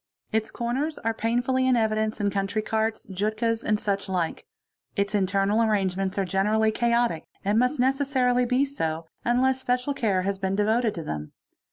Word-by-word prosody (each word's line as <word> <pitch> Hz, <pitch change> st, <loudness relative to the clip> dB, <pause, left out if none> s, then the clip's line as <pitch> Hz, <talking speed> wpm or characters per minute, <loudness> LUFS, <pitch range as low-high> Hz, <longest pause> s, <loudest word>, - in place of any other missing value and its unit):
Its 220 Hz, -1 st, 0 dB
corners 265 Hz, +6 st, -2 dB
are 225 Hz, 0 st, -1 dB
painfully 245 Hz, +3 st, +1 dB
in 255 Hz, -, +4 dB
evidence 220 Hz, -1 st, 0 dB
in 205 Hz, -1 st, +1 dB
country 195 Hz, +2 st, -1 dB
carts, 220 Hz, +1 st, -1 dB
jutkas, 220 Hz, +4 st, -1 dB
and 210 Hz, -1 st, +1 dB
such 200 Hz, -1 st, -2 dB
like. 175 Hz, -3 st, -2 dB, 0.5 s
Its 200 Hz, 0 st, 0 dB
internal 200 Hz, +2 st, +2 dB
arrangements 195 Hz, -3 st, 0 dB
are 195 Hz, -, +1 dB
generally 210 Hz, +4 st, +2 dB
chaotic 235 Hz, -7 st, +1 dB, 0.2 s
and 205 Hz, +3 st, +3 dB
must 250 Hz, +4 st, +1 dB
necessarily 260 Hz, -1 st, +2 dB
be 255 Hz, +3 st, +2 dB
so, 165 Hz, -, -3 dB, 0.2 s
unless 260 Hz, +2 st, +2 dB
special 250 Hz, +2 st, 0 dB
care 200 Hz, -8 st, 0 dB
has 195 Hz, 0 st, -2 dB
been 190 Hz, 0 st, -1 dB
devoted 220 Hz, +2 st, +1 dB
to 165 Hz, -, -5 dB
them. 75 Hz, -, -5 dB
220 Hz, 165 wpm, -26 LUFS, 195-245 Hz, 0.5 s, in